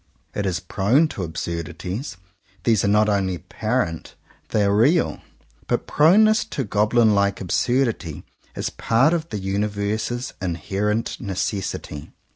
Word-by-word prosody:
It 100 Hz, -1 st, -1 dB
is 90 Hz, -2 st, -1 dB
prone 105 Hz, -, +2 dB
to 100 Hz, -, -6 dB
absurdities: 85 Hz, -, -4 dB, 0.5 s
these 110 Hz, -4 st, +3 dB
are -, -, +2 dB
not 105 Hz, +1 st, +4 dB
only 95 Hz, -3 st, +1 dB
apparent 90 Hz, -1 st, -3 dB, 0.2 s
— -, -, -33 dB
they 105 Hz, -, +2 dB
are 100 Hz, 0 st, +2 dB
real. 145 Hz, +11 st, +3 dB, 0.5 s
But -, -, 0 dB
proneness 215 Hz, +8 st, +5 dB
to 145 Hz, -11 st, -3 dB
goblin 110 Hz, +1 st, +3 dB
like 100 Hz, 0 st, +1 dB
absurdity 110 Hz, -, 0 dB, 0.3 s
is -, -, -3 dB
part 135 Hz, +8 st, +2 dB
of 165 Hz, -1 st, -2 dB
the 110 Hz, -, -3 dB
uni 100 Hz, +2 st, -1 dB
verse's 105 Hz, +4 st, -3 dB
inherent 100 Hz, +5 st, -2 dB
necessity. 95 Hz, -, -4 dB
105 Hz, 135 wpm, -22 LUFS, 95-120 Hz, 0.5 s, proneness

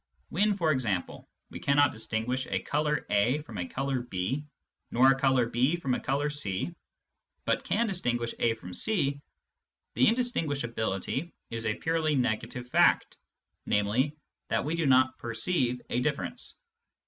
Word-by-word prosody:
When, 205 Hz, +4 st, +2 dB
for 165 Hz, -5 st, +2 dB
example, 110 Hz, -10 st, -2 dB, 0.2 s
we -, -, -7 dB
cannot 145 Hz, +1 st, +4 dB
distinguish 110 Hz, +4 st, -2 dB
a 95 Hz, -1 st, -1 dB
colour 150 Hz, 0 st, 0 dB
A 120 Hz, +9 st, +2 dB
from 110 Hz, -9 st, -8 dB
a 85 Hz, -, -2 dB
colour 135 Hz, +3 st, -1 dB
B, 120 Hz, +5 st, -3 dB, 0.4 s
nor 130 Hz, +3 st, +6 dB
a -, -, +3 dB
colour 130 Hz, -2 st, +3 dB
B 125 Hz, +7 st, +2 dB
from 135 Hz, -7 st, -1 dB
a -, -, 0 dB
colour 145 Hz, +2 st, 0 dB
C, 145 Hz, -, -2 dB, 0.7 s
but -, -, +1 dB
can 235 Hz, -, +1 dB
distinguish 125 Hz, -, -1 dB
A 115 Hz, -1 st, +2 dB
from 90 Hz, -5 st, -10 dB
C, 140 Hz, -, 0 dB, 0.7 s
the 125 Hz, -, +4 dB
indistinguishability 145 Hz, -, -1 dB, 0.2 s
is 115 Hz, 0 st, -3 dB
a 105 Hz, -, +1 dB
purely 160 Hz, -2 st, 0 dB
negative 125 Hz, 0 st, -1 dB
fact, -, -, +3 dB, 0.5 s
namely, 120 Hz, +9 st, +1 dB, 0.3 s
that -, -, 0 dB
we 155 Hz, -, -1 dB
do 165 Hz, -3 st, +1 dB
not 130 Hz, 0 st, +4 dB
perceive 125 Hz, +2 st, 0 dB
a 125 Hz, -, +1 dB
diflFerence. 145 Hz, +2 st, -2 dB
130 Hz, 150 wpm, -29 LUFS, 115-150 Hz, 0.7 s, nor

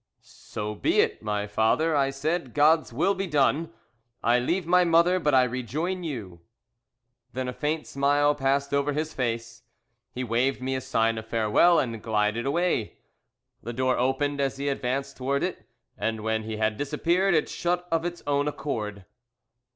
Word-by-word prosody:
"'So 105 Hz, 0 st, -7 dB
be 105 Hz, -, +1 dB
it, -, -, +1 dB
my 105 Hz, -1 st, -2 dB
father,' 110 Hz, +10 st, +1 dB
I 135 Hz, -1 st, +2 dB
said; 140 Hz, 0 st, -3 dB
'God's 155 Hz, +1 st, +4 dB
will 170 Hz, +11 st, +1 dB
be 195 Hz, 0 st, -3 dB
done. 150 Hz, +1 st, +1 dB, 0.5 s
I 120 Hz, +2 st, +4 dB
leave 170 Hz, +9 st, -1 dB
my 180 Hz, +2 st, +4 dB
mother, 170 Hz, +2 st, +4 dB
but 150 Hz, -5 st, +2 dB
I 130 Hz, -, +6 dB
rejoin 145 Hz, +9 st, -3 dB
you.' 105 Hz, -, -6 dB, 0.9 s
"Then 130 Hz, 0 st, -3 dB
a 125 Hz, -, -3 dB
faint 155 Hz, +3 st, -2 dB
smile 145 Hz, +1 st, +2 dB
passed 140 Hz, 0 st, 0 dB
over 140 Hz, +1 st, +1 dB
his 155 Hz, +2 st, -3 dB
face, 115 Hz, -1 st, -3 dB, 0.5 s
he 130 Hz, -, -4 dB
waved 125 Hz, +3 st, 0 dB
me 130 Hz, +1 st, -2 dB
a 130 Hz, -, -2 dB
sign 115 Hz, -2 st, 0 dB
of 110 Hz, -, -11 dB
farewell 115 Hz, +11 st, +4 dB
and 115 Hz, -4 st, -1 dB
glided 110 Hz, +2 st, 0 dB
away. 170 Hz, -, 0 dB, 0.6 s
"The 120 Hz, -, -6 dB
door 130 Hz, +1 st, +1 dB
opened 140 Hz, +3 st, 0 dB
as 135 Hz, -1 st, -1 dB
he 140 Hz, +1 st, -1 dB
advanced 135 Hz, 0 st, -2 dB
towards 140 Hz, +4 st, 0 dB
it, 170 Hz, -11 st, -6 dB, 0.3 s
and 110 Hz, -1 st, -2 dB
when 110 Hz, 0 st, -1 dB
he 110 Hz, -1 st, -4 dB
had 110 Hz, 0 st, 0 dB
disappeared 170 Hz, +6 st, +1 dB
it 155 Hz, -, +2 dB
shut 175 Hz, +1 st, -2 dB
of 165 Hz, 0 st, +1 dB
its 175 Hz, 0 st, -5 dB
own 145 Hz, 0 st, +1 dB
accord." 105 Hz, -10 st, -4 dB
135 Hz, 170 wpm, -26 LUFS, 115-155 Hz, 0.9 s, I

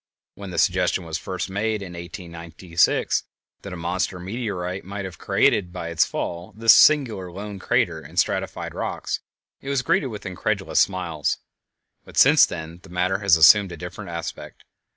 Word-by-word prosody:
When 100 Hz, 0 st, -9 dB
the 90 Hz, -, -6 dB
suggestion 90 Hz, -1 st, +1 dB
was 80 Hz, -1 st, -4 dB
first 95 Hz, -1 st, -4 dB
made 105 Hz, +2 st, -2 dB
in 90 Hz, -2 st, -9 dB
1896 85 Hz, -1 st, -1 dB, 0.4 s
that 100 Hz, -, -8 dB
a -, -, -5 dB
monster 90 Hz, +2 st, -2 dB
meteorite 95 Hz, -2 st, -4 dB
might 100 Hz, +1 st, -6 dB
have 90 Hz, -4 st, -9 dB
created 90 Hz, -3 st, +2 dB
by 85 Hz, -2 st, -5 dB
its 85 Hz, -1 st, +3 dB
fall 85 Hz, +2 st, -5 dB
this 115 Hz, 0 st, +7 dB
singular 115 Hz, -12 st, +4 dB
lone 100 Hz, +2 st, -7 dB
crater -, -, 0 dB
in -, -, -13 dB
stratified -, -, -1 dB
rocks, -, -, -3 dB, 0.4 s
it 135 Hz, -, -7 dB
was 140 Hz, -2 st, 0 dB
greeted 165 Hz, -2 st, +1 dB
with 105 Hz, -4 st, -8 dB
incredulous 90 Hz, -2 st, -1 dB
smiles; 85 Hz, -6 st, 0 dB, 0.7 s
but -, -, -14 dB
since -, -, +7 dB
then 80 Hz, +1 st, -7 dB
the -, -, -16 dB
matter 90 Hz, +2 st, 0 dB
has 100 Hz, -5 st, +4 dB
assumed 95 Hz, +5 st, +7 dB
a 85 Hz, -, -7 dB
different 90 Hz, +1 st, -8 dB
aspect. 85 Hz, -1 st, -7 dB
90 Hz, 165 wpm, -23 LUFS, 85-100 Hz, 0.7 s, this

